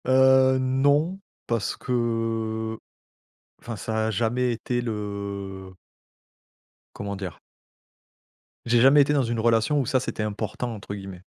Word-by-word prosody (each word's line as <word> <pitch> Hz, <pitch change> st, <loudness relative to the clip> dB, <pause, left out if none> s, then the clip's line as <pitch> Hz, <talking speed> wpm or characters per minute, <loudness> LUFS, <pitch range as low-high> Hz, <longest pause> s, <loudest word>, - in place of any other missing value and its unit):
Heu, 130 Hz, 0 st, +5 dB
non 145 Hz, +7 st, +2 dB, 0.3 s
parce 115 Hz, -4 st, -1 dB
que 115 Hz, -2 st, -1 dB, 0.8 s
enfin 115 Hz, -2 st, -6 dB
ça 110 Hz, +1 st, -1 dB
a -, -, 0 dB
jamais 120 Hz, +3 st, 0 dB
été 120 Hz, +2 st, -2 dB
le 100 Hz, -4 st, -5 dB, 1.2 s
comment 100 Hz, 0 st, -5 dB
dire? 95 Hz, -5 st, -6 dB, 1.3 s
J'ai 120 Hz, 0 st, +3 dB
jamais 135 Hz, +4 st, +7 dB
été 145 Hz, -, +2 dB
dans 140 Hz, -2 st, +3 dB
une 115 Hz, -1 st, -2 dB
relation 115 Hz, +5 st, +2 dB
où 130 Hz, -, -1 dB
ça 130 Hz, -, +2 dB
c'était 125 Hz, -, -4 dB
«important» 110 Hz, +3 st, -3 dB
entre 100 Hz, -1 st, -7 dB
guillemets. 95 Hz, -2 st, -8 dB
115 Hz, 125 wpm, -25 LUFS, 105-130 Hz, 1.3 s, jamais